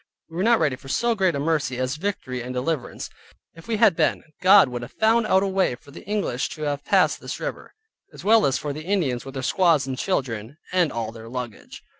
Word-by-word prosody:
We 165 Hz, -, -8 dB
were 185 Hz, -, 0 dB
not 235 Hz, +1 st, +5 dB
ready 150 Hz, -5 st, +1 dB
for 135 Hz, -, -14 dB
so 235 Hz, -, +1 dB
great 190 Hz, -6 st, +1 dB
a -, -, -2 dB
mercy 140 Hz, -4 st, 0 dB
as 130 Hz, +3 st, -2 dB
victory 155 Hz, -9 st, -3 dB
and 125 Hz, +1 st, -6 dB
deliverance. 135 Hz, +2 st, -3 dB, 0.5 s
If 165 Hz, +4 st, -15 dB
we 225 Hz, -2 st, 0 dB
had 210 Hz, -5 st, +5 dB
been 155 Hz, -2 st, +1 dB, 0.2 s
God 190 Hz, -3 st, +7 dB
would 125 Hz, -1 st, -5 dB
have 120 Hz, -, -9 dB
found 225 Hz, +1 st, +2 dB
out 190 Hz, +1 st, +4 dB
a -, -, 0 dB
way 190 Hz, -8 st, +1 dB
for 140 Hz, -, -18 dB
the -, -, -11 dB
English 200 Hz, -11 st, -1 dB
to 155 Hz, -, -7 dB
have 145 Hz, -1 st, -2 dB
passed -, -, +2 dB
this -, -, -6 dB
river, -, -, -6 dB, 0.4 s
as -, -, -12 dB
well 220 Hz, +1 st, +5 dB
as 135 Hz, -, +1 dB
for 145 Hz, -1 st, -4 dB
the 155 Hz, -, -7 dB
Indians 165 Hz, -11 st, 0 dB
with 135 Hz, 0 st, -9 dB
their 130 Hz, -, -4 dB
squaws 165 Hz, -3 st, +3 dB
and 135 Hz, -1 st, -3 dB
children, 125 Hz, -, -2 dB, 0.2 s
and 175 Hz, -5 st, +3 dB
all 115 Hz, -2 st, -3 dB
their 115 Hz, 0 st, -11 dB
luggage. 125 Hz, -2 st, -7 dB
150 Hz, 235 wpm, -24 LUFS, 130-195 Hz, 0.5 s, God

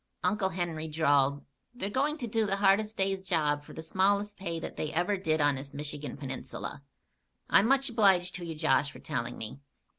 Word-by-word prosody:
Uncle 205 Hz, -2 st, +1 dB
Henry 165 Hz, -3 st, -3 dB
drawled: 145 Hz, -3 st, +2 dB, 0.3 s
"They're 205 Hz, -4 st, -3 dB
going 290 Hz, +6 st, +1 dB
to 245 Hz, -6 st, -4 dB
do 225 Hz, -1 st, +1 dB
the 195 Hz, -, +1 dB
hardest 205 Hz, +2 st, +3 dB
day's 195 Hz, 0 st, +1 dB
job 150 Hz, -6 st, +1 dB
for -, -, -12 dB
the 160 Hz, -, -7 dB
smallest 200 Hz, +4 st, +1 dB
pay 170 Hz, -4 st, -4 dB
that -, -, -6 dB
they 155 Hz, -, -3 dB
ever 175 Hz, +5 st, +1 dB
did 160 Hz, -5 st, 0 dB
on 145 Hz, -1 st, +4 dB
this 135 Hz, +1 st, -7 dB
Michigan 145 Hz, 0 st, -5 dB
Peninsula. 135 Hz, 0 st, -6 dB, 0.7 s
I'm 205 Hz, -, +6 dB
much 275 Hz, +1 st, +3 dB
obliged 195 Hz, -6 st, +3 dB
to 180 Hz, -, -8 dB
you, 165 Hz, -2 st, -5 dB
Josh, 155 Hz, -2 st, +2 dB
for -, -, -12 dB
telling 120 Hz, -4 st, -3 dB
me. 110 Hz, +5 st, -6 dB
175 Hz, 190 wpm, -30 LUFS, 145-200 Hz, 0.7 s, I'm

